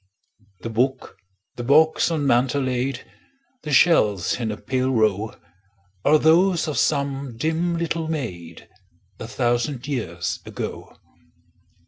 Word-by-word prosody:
The 115 - -5
book, 130 +2 -1 0.4
the 120 - -4
box 155 +7 +4
on 155 -4 -1
mantel 135 +2 +2
laid, 130 0 -2 0.6
The 150 - -6
shells 110 - +3
in 115 -3 -2
a 105 - -5
pale 130 0 -1
row, 110 -3 +1 0.7
Are 155 +2 +5
those 170 +3 +3
of 150 - -1
some 140 -4 -1
dim 165 +5 -1
little 165 -1 -2
maid, 90 - -6 0.5
A 110 - -6
thousand 120 +2 -1
years 90 - -3
ago. - - -7
130 Hz, 120 wpm, -22 LUFS, 115-155 Hz, 0.7 s, Are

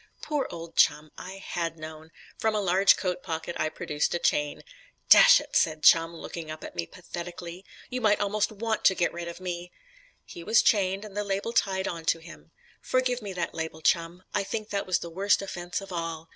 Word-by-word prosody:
Poor 295 -3 -1
old 165 -1 -9
Chum; 150 +1 +3
I 185 - -8
had 170 -4 -4
known. 155 0 -9 0.3
From 220 -1 +1
a - - +1
large 190 0 +4
coat 180 -2 -2
pocket 165 -1 -4
I 155 - +1
produced 150 0 -2
a - - +2
chain. 150 -3 0 0.5
"Dash - - +9
it," - - -10
said 155 -2 +2
Chum, 165 0 +6
looking 165 -1 -7
up 155 0 -7
at - - -9
me 85 -1 -3
pathetically, 175 0 -8 0.3
"you 250 0 -2
might 210 -2 +3
almost 205 +1 0
want 220 +1 -2
to 190 - +6
get 175 - 0
rid 170 0 -6
of 170 - -7
me." 175 -1 -5 0.5
He 170 - -10
was 220 +6 +4
chained, 195 -1 +2
and 205 -2 -11
the 210 - -1
label 200 +3 -2
tied 190 -4 +1
on 165 -2 -5
to 165 - +3
him. 165 +1 -14 0.3
Forgive 255 -1 0
me 205 -2 -6
that 175 -2 -3
label, 160 -1 -5
Chum; 170 +2 +1
I - - +1
think 215 +2 -4
that 200 -1 -2
was 185 -2 +2
the 170 - -8
worst 195 +4 +2
offence 175 -1 -4
of 195 - -10
all. 165 -2 -4
180 Hz, 210 wpm, -27 LUFS, 165-200 Hz, 0.5 s, Dash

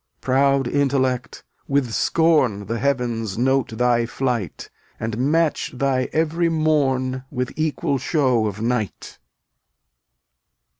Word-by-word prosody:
Proud 135 0 +2
Intellect! 130 -2 0 0.2
with 140 -4 0
scorn 140 -13 +2
The 115 +2 -3
Heavens 120 -6 -1
note 125 -2 +1
thy 120 -1 +2
flight, 120 -7 -3 0.3
And 110 0 -3 0.2
match 165 -1 +1
thy 130 -1 0
every 165 +2 +1
morn 135 -5 +1
With 125 -1 -3
equal 150 -3 -1
show 130 -6 +1
of 105 0 -5
night. 115 -2 -3
130 Hz, 105 wpm, -22 LUFS, 120-140 Hz, 0.3 s, Proud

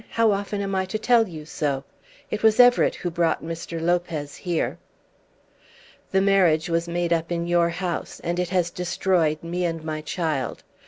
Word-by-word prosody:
How 230 -1 +3
often 200 0 -2
am 195 -1 -3
I 190 0 +1
to 190 +3 -3
tell 230 0 +3
you 155 -4 -8
so? 140 -3 -2 0.5
It 215 - -2
was 220 0 +4
Everett 245 0 +6
who 175 - -4
brought 165 -1 0
Mr. 165 0 -5
Lopez 165 -4 -1
here." 175 -3 -2 1.3
"The 190 - +2
marriage 185 -5 +3
was 165 +1 0
made 170 0 0
up 165 0 -1
in 170 0 -1
your 170 0 +3
house, 175 0 -4
and 175 +1 -1
it 180 -1 -1
has 180 -2 +1
destroyed 175 -3 0
me 175 +2 -2
and 165 -2 -2
my 155 -1 -3
child. 155 -4 -2
175 Hz, 175 wpm, -24 LUFS, 165-190 Hz, 1.3 s, Everett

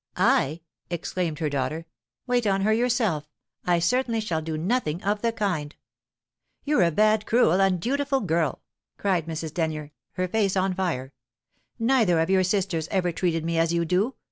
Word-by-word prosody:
"I?" 155 +5 +2 0.3
exclaimed 175 -2 -2
her 155 -2 -1
daughter. 145 +4 -2 0.4
"Wait 245 -3 +1
on 195 -1 +2
her 215 +2 +3
yourself! 220 - 0 0.4
I 175 -1 +4
certainly 230 +6 +1
shall 175 -7 -2
do 160 0 -4
nothing 175 -2 -1
of 205 +1 0
the 230 - +1
kind." 180 -10 -2 0.9
"You're 295 -6 +2
a 170 - +5
bad, 215 +5 +2
cruel, 205 -6 +4
undutiful 265 +9 +1
girl!" 165 -6 0 0.3
cried 180 -5 0
Mrs. 160 -1 -4
Denyer, 155 -3 -2 0.2
her 185 0 -1
face 200 0 +1
on 190 0 +1
fire. 160 -8 -2 0.6
"Nether 225 -8 +3
of 165 +3 +1
your 190 -1 +4
sisters 185 -4 0
ever 180 -3 +1
treated 165 -2 -1
me 165 0 0
as 165 0 +2
you 170 0 +1
do. 190 +10 +1
180 Hz, 165 wpm, -25 LUFS, 160-215 Hz, 0.9 s, a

